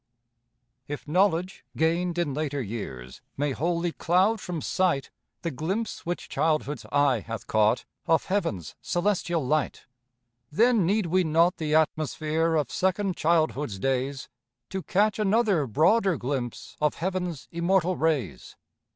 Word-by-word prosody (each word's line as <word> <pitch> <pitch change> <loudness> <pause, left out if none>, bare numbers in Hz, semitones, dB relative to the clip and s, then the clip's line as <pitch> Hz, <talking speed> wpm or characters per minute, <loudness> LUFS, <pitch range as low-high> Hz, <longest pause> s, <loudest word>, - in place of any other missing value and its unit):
If 145 +1 -6
knowledge 180 +2 +1
gained 170 +2 +1
in 170 -5 0
later 145 -1 -2
years 95 - -6 0.2
May 145 +1 0
wholly 170 +5 -1
cloud 190 +7 +2
from 175 -3 -4
sight 170 -4 0 0.3
The 170 - -1
glimpse 185 - -3
which 175 - -3
childhood's 155 -3 -1
eye 145 -4 +3
hath 115 +1 -7
caught 110 +2 +2 0.2
Of 165 - +3
heaven's 110 - -2
celestial 175 -4 0
light, 155 +3 -1 0.7
Then 225 +1 +3
need 205 +1 +2
we 180 +2 +2
not 165 +2 +3
the 155 -1 0
atmosphere 160 +1 +1
Of 150 -2 0
second 190 0 0
childhood's 155 - +1
days 135 +4 -1 0.4
To 190 - -2
catch 205 +4 +1
another 205 - +2
broader 175 - +3
glimpse 125 -2 -4
Of 150 -1 +2
heaven's 180 -4 -3
immortal 180 +1 +1
rays? 135 - -1
165 Hz, 130 wpm, -26 LUFS, 145-185 Hz, 0.7 s, eye